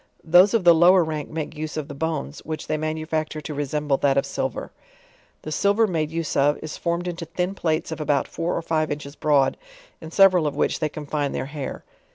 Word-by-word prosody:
Those 180 +6 +6
of 220 - +2
the 170 -1 +8
lower 175 +2 +6
rank 155 -2 -4
make 155 0 -5
use 155 +1 -5
ef 150 -2 -3
the 145 - -7
bones, 145 -1 -3
which 155 -1 -6
they 155 - -1
manufacture 155 0 -2
to 150 +1 -6
resemble 145 0 -1
that 140 -1 +2
of 140 - +2
silver. 135 -2 -4 0.7
The 155 - -6
silver 200 +7 +3
made 160 -6 -1
use 165 -1 -3
of, 145 +2 +3
is 155 - -6
formed 170 +1 -2
into 175 -1 -4
thin 180 +3 -2
plates 165 -4 -1
of 160 - -4
about 145 -2 +1
four 170 +1 -2
cr - - -26
five 155 -1 +1
inches 145 0 -5
broad, 145 -3 +2 0.4
in 160 - -8
several 180 -2 +5
of 145 - -3
which - - 0
they 155 -1 0
confine 145 -1 -3
their 130 - -2
hair. 145 -3 -5
155 Hz, 210 wpm, -23 LUFS, 145-165 Hz, 0.7 s, the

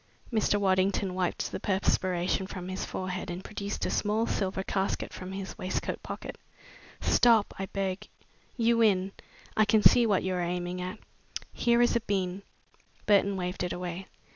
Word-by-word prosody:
Mr. 210 -2 +2
Waddington 190 0 +2
wiped 180 -1 -1
the - - -4
perspiration 185 -1 0
from 185 -2 -6
his 185 - -3
forehead 185 0 -4
and 175 +2 -5
produced 200 -1 -4
a - - -1
small 215 +2 +1
silver 190 -3 -1
casket 195 0 -2
from 185 0 -7
his 195 0 -6
waistcoat 185 -1 -2
pocket. - - -7 0.6
"Stop!" 230 -4 +4
he 195 - -2
begged. 195 -1 -3 0.5
"You 230 0 +3
win! 195 -4 +3 0.4
I 215 - +5
can 210 0 +3
see 240 -2 +7
what 200 -3 +2
you 185 0 -1
are 180 - -1
aiming 175 +1 -2
at. 185 +4 -4 0.6
Here 235 0 +3
is 240 - +2
a - - +4
bean." 195 -3 -2 0.6
Burton 200 -1 +4
waved 180 0 -3
it 180 -1 -1
away. 180 +1 -5
190 Hz, 165 wpm, -29 LUFS, 185-205 Hz, 0.6 s, see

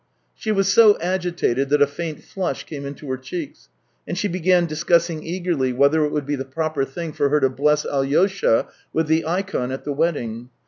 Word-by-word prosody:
She 220 - -3
was 195 -2 +2
so 210 +1 +6
agitated 175 -7 -1
that 150 +1 +3
a - - +5
faint 150 +2 -6
flush 185 -3 -3
came 140 -3 -7
into 145 +1 -9
her 130 - -1
cheeks, 140 +4 -7 0.4
and 175 - -3
she 205 - 0
began 180 -1 +2
discussing 165 +1 +1
eagerly 170 -7 -1
whether 140 +5 +3
it 150 - -2
would 150 -2 -2
be 145 +1 -1
the 135 - -4
proper 155 +1 -2
thing 155 +4 -6
for 140 - +1
her 150 +1 +3
to 135 -2 +3
bless 150 +3 +1
Alyosha 145 - +2 0.3
with 160 - +1
the 160 +1 +2
ikon 175 -7 -1
at 135 - -5
the 145 - -3
wedding. 125 -7 -2
155 Hz, 195 wpm, -22 LUFS, 140-175 Hz, 0.4 s, so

